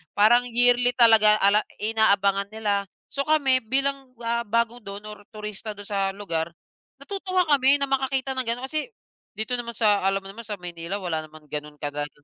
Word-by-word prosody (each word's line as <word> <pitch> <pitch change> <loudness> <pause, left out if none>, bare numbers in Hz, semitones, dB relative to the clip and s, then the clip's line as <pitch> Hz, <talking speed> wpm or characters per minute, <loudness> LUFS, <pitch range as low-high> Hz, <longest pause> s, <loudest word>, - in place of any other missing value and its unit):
Parang 240 +4 +4
yearly 245 +1 +3
talaga 220 -3 +7
ala 200 +1 +5 0.2
inaabangan 200 -2 +2
nila. 200 -2 -1 0.2
So, 275 +1 -3
kami 280 -4 +3
bilang, 270 0 -2
ah, 235 0 -1
bago 230 +2 0
do'n 200 -2 -9
or 205 -1 -14
turista 215 -2 -7
do'n 205 - -10
sa 200 - -1 0.2
lugar, 170 -4 -4 0.5
natutuwa 375 0 -1
kami 275 -1 +5
na 280 -1 0
makakita 270 0 0
ng 260 - -1
gano'n. 235 +2 -1
Kasi, 310 +5 -2 0.5
dito 220 +4 -2
naman 240 -1 -4
sa 210 -3 +2
alam 195 0 +1
mo 195 - -12
naman 210 +4 -9
sa 210 -3 -7
Maynila 175 +2 -5
wala 165 -4 -3
naman 155 0 -15
gano'n 150 0 -6
kagaya 145 0 -4
220 Hz, 175 wpm, -24 LUFS, 200-250 Hz, 0.5 s, talaga